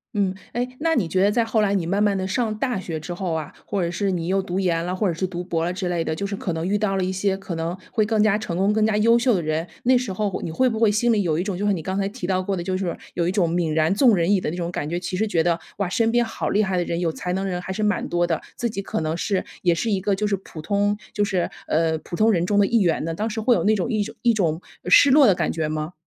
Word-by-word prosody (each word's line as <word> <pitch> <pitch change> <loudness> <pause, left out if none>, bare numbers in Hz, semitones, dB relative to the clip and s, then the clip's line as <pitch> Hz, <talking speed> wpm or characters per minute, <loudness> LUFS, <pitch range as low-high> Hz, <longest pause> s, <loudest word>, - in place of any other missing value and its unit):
嗯， 195 -2 +1 0.2
诶， 245 +1 -1
那 325 +1 +1
你 215 - +1
觉 185 +3 +1
得 200 +2 +4
在 230 +1 +2
后 225 -1 +1
来 200 -1 +2
你 180 -4 0
慢 195 +4 0
慢 205 -2 +2
地 190 0 -2
上 220 +1 -1
大 245 -3 -1
学 165 -4 -5
之 175 +3 -6
后 180 -1 -3
啊， 160 -2 -4
或 195 -3 -1
者 170 - -1
是 195 +3 -1
你 175 -3 -1
又 190 +2 +1
读 185 0 -3
研 170 -3 +1
了， 180 +2 -2
或 205 +2 0
者 175 - 0
是 185 +3 -2
读 180 -1 -5
博 165 -2 -1
了 175 - 0
之 185 0 -3
类 175 -2 0
的， 160 - -2
就 200 - -3
是 200 0 -3
可 190 - -3
能 165 +2 -2
遇 205 +2 +1
到 200 -2 0
了 190 - 0
一 185 - -1
些 190 +1 0
可 195 -2 -6
能 165 +2 -3
会 220 - +2
更 215 0 +2
加 215 -2 +3
成 210 -5 -3
功、 195 +3 +2
更 220 0 +2
加 215 -1 +2
优 230 +2 +4
秀 245 -2 +3
的 180 - 0
人。 155 +2 -1 0.2
那 255 +1 +4
时 245 -4 0
候 200 0 -2
你 165 - -4
会 255 +11 +2
不 225 -3 -1
会 225 -2 +5
心 230 +3 +2
里 210 - +2
有 160 -5 0
一 175 - 0
种， 195 -2 -3
就 205 +3 -1
是 205 - +3
你 165 -4 -4
刚 190 +4 -3
才 195 0 0
提 230 -1 -7
到 185 0 +1
过 195 +1 -2
的， 175 - -3
就 185 +1 -2
是 190 - -2
说 175 - -3 0.2
有 170 -1 0
一 180 - +1
种 175 -4 +1
泯 170 -2 0
然 160 +3 +2
众 235 0 +5
人 175 +2 +1
矣 195 - +2
的 - - -2
那 170 - -4
种 170 -1 -3
感 150 -4 -3
觉。 175 +2 -2
其 180 +1 -4
实 220 +4 0
觉 165 -6 +1
得 170 -1 +1 0.2
哇， 200 -2 0
身 225 +5 +1
边 240 0 +2
好 225 - -3
厉 210 - +2
害 190 -2 -1
的 175 - +1
人， 170 0 -2
有 170 -2 0
才 180 +2 -4
能 190 +1 -1
的 195 - -2
人 180 0 -3
还 190 - -6
是 210 +3 -2
蛮 210 -1 0
多 175 0 +1
的。 165 -2 -1
自 240 - -1
己 210 -3 -4
可 190 - -3
能 160 0 -1
是 190 +2 -1 0.2
也 175 -2 +3
是 220 +7 -1
一 195 -2 0
个， 200 +1 +1
就 210 +2 -1
是 205 -1 +1
普 175 -3 -12
通 205 +5 0 0.2
就 205 - +1
是， 190 -4 0 0.2
呃， 160 0 +1
普 175 - -7
通 220 +4 +4
人 175 -3 +1
中 205 - +1
的 205 - +5
一 230 +3 +2
员 175 -7 +1
呢？ 165 +1 -2
当 215 +7 -2
时 220 +1 -4
会 240 +3 +3
有 - - +1
那 215 +1 +3
种 190 - -1
一 215 -2 +1
种 210 - -8
一 240 -1 +4
种 170 -7 0 0.3
失 265 +10 +6
落 280 -1 +7
的 195 - +5
感 170 -3 0
觉 160 -2 -2
吗？ 155 +2 -3
190 Hz, 360 characters per minute, -23 LUFS, 175-210 Hz, 0.3 s, 落